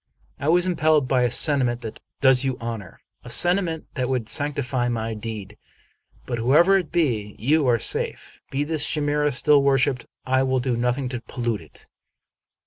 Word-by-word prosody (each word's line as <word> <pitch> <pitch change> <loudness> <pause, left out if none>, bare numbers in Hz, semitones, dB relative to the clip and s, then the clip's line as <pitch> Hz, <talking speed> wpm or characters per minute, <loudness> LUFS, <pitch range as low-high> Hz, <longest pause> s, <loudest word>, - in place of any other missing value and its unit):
" - - -33
I 140 - -3
was 175 +2 +4
impelled 155 -5 +2
by 130 0 +2
a 125 - +2
sentiment 125 -3 +1
that 110 -3 -7 0.2
does 130 -2 +5
you 130 -2 -1
honor; 115 -5 -7 0.2
a 120 - -10
sentiment 175 +4 0
that 130 -2 -2
would 125 -4 -2
sanctify 135 -4 0
my 115 -1 -2
deed; 105 -2 -7 0.7
but, 120 -2 -3
whatever 150 +11 +4
it 180 -6 -1
be, 115 -11 -1
you 145 +5 +2
are 120 -1 +4
safe. - - -2
Be 140 +2 -1
this 155 0 -1
chimera 150 -1 +1
still 145 +2 +4
worshiped; 135 -2 +1 0.2
I 130 0 +2
will 130 0 +1
do 125 -1 -1
nothing 125 +3 -1
to 125 -2 -5
pollute 120 -5 -3
it." 80 - -16
130 Hz, 175 wpm, -23 LUFS, 120-150 Hz, 0.7 s, does